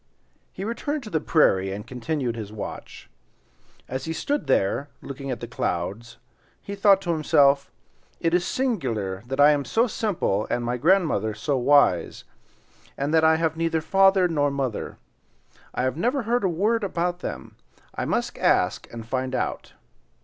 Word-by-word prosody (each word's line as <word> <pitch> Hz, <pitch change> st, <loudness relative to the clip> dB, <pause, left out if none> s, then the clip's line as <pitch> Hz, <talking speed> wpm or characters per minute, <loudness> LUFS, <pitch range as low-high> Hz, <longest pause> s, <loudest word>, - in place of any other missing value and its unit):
He 190 Hz, -, -7 dB
returned 280 Hz, +6 st, -3 dB
to 215 Hz, -, -9 dB
the 160 Hz, -, +1 dB
prairie 95 Hz, -, +3 dB
and 105 Hz, +2 st, -6 dB
continued 125 Hz, 0 st, -3 dB
his 105 Hz, -3 st, -6 dB
watch. 105 Hz, -1 st, -8 dB, 0.8 s
As 130 Hz, +1 st, -4 dB
he 160 Hz, -, -3 dB
stood 290 Hz, -, -2 dB
there 135 Hz, +9 st, +1 dB
looking 140 Hz, 0 st, -7 dB
at 125 Hz, -, -4 dB
the 120 Hz, -, -5 dB
clouds 105 Hz, +9 st, -3 dB, 0.4 s
he 200 Hz, -, -8 dB
thought 200 Hz, -1 st, +4 dB
to 175 Hz, -3 st, -2 dB
himself, 140 Hz, -3 st, +3 dB, 0.5 s
"It 165 Hz, 0 st, 0 dB
is 180 Hz, 0 st, +3 dB
singular 125 Hz, -, -2 dB
that 135 Hz, +2 st, -4 dB
I 145 Hz, +1 st, +8 dB
am 145 Hz, -1 st, +1 dB
so 225 Hz, -, +2 dB
simple 195 Hz, -, -1 dB
and 120 Hz, 0 st, -1 dB
my 120 Hz, +1 st, -1 dB
grandmother 140 Hz, -, +2 dB
so 140 Hz, +6 st, -1 dB
wise; 130 Hz, -, +3 dB, 0.7 s
and 140 Hz, +3 st, -2 dB
that 160 Hz, -1 st, +4 dB
I 160 Hz, 0 st, +5 dB
have 160 Hz, -1 st, 0 dB
neither 165 Hz, 0 st, 0 dB
father 195 Hz, +2 st, +4 dB
nor 145 Hz, -4 st, +1 dB
mother. 135 Hz, -5 st, -3 dB, 0.7 s
I -, -, -2 dB
have 130 Hz, +2 st, -1 dB
never 245 Hz, -, 0 dB
heard 240 Hz, +1 st, 0 dB
a 190 Hz, -, +2 dB
word 210 Hz, +7 st, +1 dB
about 175 Hz, -2 st, -1 dB
them. -, -, -7 dB, 0.4 s
I -, -, -3 dB
must -, -, -2 dB
ask -, -, +1 dB
and 115 Hz, -1 st, -8 dB
find 130 Hz, +1 st, -2 dB
out." -, -, -3 dB
145 Hz, 165 wpm, -24 LUFS, 120-185 Hz, 0.8 s, I